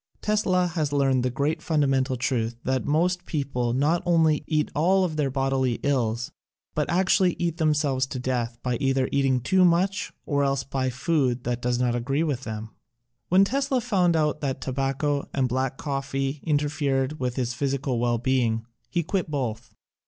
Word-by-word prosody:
Tesla 190 -4 +1
has 160 -4 -1
learned 135 -3 +2
the 125 - 0
great 140 +6 -1
fundamen 140 -5 +2
tal 130 0 -3
truth 120 -2 -1
that 130 0 -1
most 175 +4 +1
people 130 -5 -1
not 150 +7 +2
only 165 -3 +3
eat 155 -2 0
all 185 +5 +3
of 170 -4 -1
their 150 -3 0
bodily 135 -1 0
ills, 120 -4 0 0.4
but - - -1
actually 185 0 +3
eat 170 -1 -1
them 155 -2 +2
selves 135 -3 0
to 130 - -5
death 125 -2 -2
by 125 -2 0
either 135 -2 +1
eating 135 -2 +2
too 185 +9 +3
much 185 +3 +2
or 145 -1 +1
else 135 -1 0
by 135 -1 -2
food 130 -2 0
that 120 0 -2
does 125 0 0
not 125 -1 +1
agree 135 +6 0
with 135 -5 -2
them. 110 0 -6 0.6
When 185 +2 +6
Tesla 270 +3 0
found 190 -8 +2
out 150 -1 +1
that 135 -3 -2
tobacco 135 +2 -1
and 135 -2 +2
black 130 +1 -1
coffee 135 0 -2
interfered 145 -1 0
with 125 -1 -2
his 125 -2 -1
physical 135 -1 -1
well 120 0 +1
being, 115 -2 0 0.2
he 170 - 0
quit 180 0 -2
both. 130 -7 -4
140 Hz, 175 wpm, -25 LUFS, 130-160 Hz, 0.6 s, When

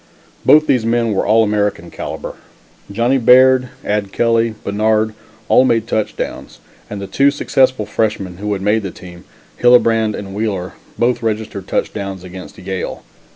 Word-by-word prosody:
Both 155 +1 +6
these 125 -6 +2
men 115 -1 +1
were 95 - -1
All 110 +2 +4
American 105 -5 -1
calibre. - - -6 0.6
Johnny 120 +6 +1
Baird, 130 +1 +5 0.2
Ad 105 -1 -1
Kelly, 115 0 +1
Bannard, 110 +1 +1 0.3
all - - +5
made 115 -4 +1
touchdowns 110 -2 -4 0.3
and 105 - -6
the 100 - -5
two 140 +8 +3
successful 130 -5 +1
freshmen 100 -6 -2
who 105 +2 -4
had 95 -1 -4
made 105 +2 +2
the 100 - -5
team, 90 0 -13 0.4
Hillebrand 115 -3 +4
and 95 -1 -7
Wheeler, 100 -3 -3 0.2
both 120 +1 +1
registered 110 -4 -3
touchdowns 100 -3 -3
against 90 0 -10
Yale. 95 0 -5
110 Hz, 150 wpm, -17 LUFS, 100-115 Hz, 0.6 s, Both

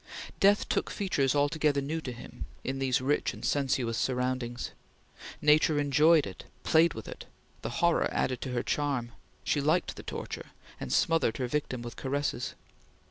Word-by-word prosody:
Death 200 +1 +4
took - - 0
features 145 -9 0
altogether 145 0 +2
new 155 +4 -2
to 130 - -5
him, 120 - -9 0.2
in 135 +1 -3
these 130 -2 +1
rich 140 +3 0
and - - -7
sensuous 130 -5 0
surroundings. 125 -2 -1 0.7
Nature 150 +1 +5
enjoyed 150 +2 +4
it, 95 - -9 0.2
played 165 +1 +4
with 110 - -7
it, - - -8 0.4
the 115 - -3 0.2
horror 170 - +3
added 130 -2 -1
to 130 - -4
her 120 -1 -1
charm, 135 -5 -1 0.3
she 145 - +1
liked 155 +5 +1
the - - -8
torture, - - -6 0.3
and - - -5
smothered 165 -8 +2
her 130 - -1
victim 125 -2 -2
with 120 - -8
caresses. 135 -2 -2
140 Hz, 160 wpm, -29 LUFS, 125-150 Hz, 0.7 s, Nature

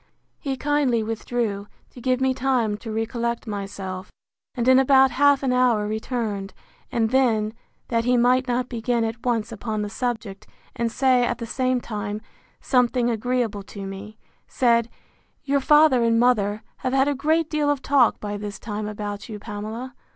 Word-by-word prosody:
He 270 -3 -3
kindly 280 -5 +1
withdrew, 220 -2 -2 0.2
to 245 - -12
give 255 +1 +1
me 265 0 +2
time 250 -5 +1
to 225 +1 -7
recollect 235 +2 -2
myself; 195 -3 -6 0.4
and 240 -1 -1
in 260 0 +7
about 265 0 +5
half 285 +1 +4
an 255 -2 +1
hour 245 -4 +3
returned: 215 -3 -3 0.4
and 225 -1 +1
then, 225 -5 +2 0.4
that 230 -1 +1
he 250 +1 +3
might 250 +2 +3
not 250 0 0
begin 235 -1 -1
at 225 0 -4
once 230 -2 0
upon 215 -1 -3
the 205 - -5
subject, 220 -5 -4 0.3
and 235 -1 -1
say, 255 0 +3
at - - 0
the 230 - -5
same 255 +1 0
time, 210 -3 -4 0.4
something 245 -1 +2
agreeable 230 -2 -1
to 200 0 -9
me, 195 +3 -8 0.3
said, 235 -2 +2 0.5
Your 280 0 +1
father 295 -3 +5
and 230 0 +3
mother 215 -4 +2
have 255 0 -3
had 270 +1 +3
a 290 - +2
great 310 +4 +1
deal 305 -2 0
of 285 -2 0
talk 270 -4 +3
by 205 -1 -4
this 205 -1 -6
time 210 -1 -5
about 205 0 -5
you, 215 - -5
Pamela. 220 +4 -6
235 Hz, 170 wpm, -23 LUFS, 215-255 Hz, 0.5 s, in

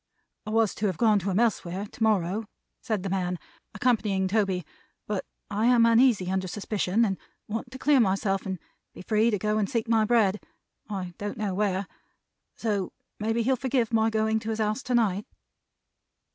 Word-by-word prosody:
"I - - -2
was 220 -2 +2
to 210 - -1
have 185 -4 -2
gone 215 -3 +4
to 195 +1 -3
him 190 +2 +1
elsewhere 200 -4 0
to 215 - -15
morrow," 210 -1 +1 0.4
said 215 -6 -2
the 195 - -2
man, 180 -2 -1 0.4
accompanying 210 -4 +1
Toby, 190 -4 0 0.4
"but 205 -2 -3 0.2
I 215 +3 +1
am 240 -2 +6
uneasy 230 -5 +4
under 190 0 -1
suspicion, 205 +2 0
and 195 -3 -2 0.3
want 225 +4 -4
to 260 - -9
clear 280 +1 +4
myself 195 -2 +1
and 190 -1 -2
to - - -37 0.3
be - - -9
free 215 +3 +3
to 210 - +1
go 210 +2 0
and 205 - 0
seek 230 -3 -1
my 225 -1 +3
bread 210 -3 +3 0.5
I 185 -4 -4
don't 205 +1 -4
know 210 -3 -2
where. 195 0 0 0.7
So, 205 -5 -2 0.3
maybe 225 +2 0
he'll 260 +3 +2
forgive 250 -2 0
my 220 0 +3
going 220 0 +1
to 220 0 -6
his 220 - -1
house 215 +2 0
to 250 -2 -1
night." 210 -4 +1
215 Hz, 185 wpm, -27 LUFS, 195-225 Hz, 0.7 s, am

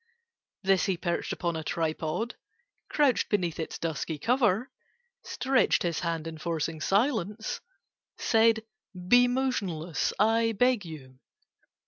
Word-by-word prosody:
[Picture: 465 0 -41 0.5
The - - -12
camera] 195 - +7
This 190 - +1
he 190 -3 0
perched 170 0 -2
upon 170 -1 -2
a 160 - -4
tripod— 160 +8 -2 0.5
Crouched 285 -4 +2
beneath 175 -6 0
its 160 - -4
dusky 160 -1 -3
cover— 235 - +1 0.5
Stretched 265 0 +1
his 170 -3 -1
hand, 165 -2 -2
enforcing 160 -1 -3
silence— 215 - 0 0.6
Said, 225 -1 +3 0.4
"Be 245 +4 +6
motionless, 195 - -1
I 225 +2 +3
beg 245 -2 +2
you!" 130 -6 -10
195 Hz, 125 wpm, -28 LUFS, 165-235 Hz, 0.6 s, camera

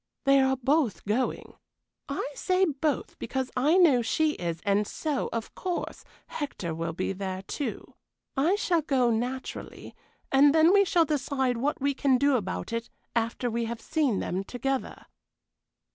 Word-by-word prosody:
"They 275 -1 +5
are 265 0 +2
both 260 - +1
going. 220 +5 -1 0.6
I 275 - -2
say 370 +5 +2
both 295 -3 -2
because 260 +2 -3
I 295 +8 +3
know 305 -10 +5
she 310 +6 +1
is, 170 - -4
and 200 +1 +2
so, 300 -4 -2
of 230 -1 -4
course, 360 -2 -4 0.2
Hector 190 - -4
will 165 +1 -3
be 185 - -2
there 190 -1 -4
too. 285 +8 -5 0.4
I 310 +8 +3
shall 355 -5 +1
go, 260 -5 +2
naturally, 245 +4 -4 0.4
and 280 +2 +6
then 320 +3 +6
we 400 0 +6
can 340 -2 +3
decide 265 -4 0
what 280 +5 -1
we 280 +1 +1
can 270 -1 +2
do 280 +1 +3
about 220 +1 -3
it 230 0 -3 0.3
after 230 +2 0
we 230 +1 -1
have 230 0 -4
seen 280 -6 0
them 185 +1 -2
together." 260 +5 -3
265 Hz, 160 wpm, -27 LUFS, 230-300 Hz, 0.6 s, and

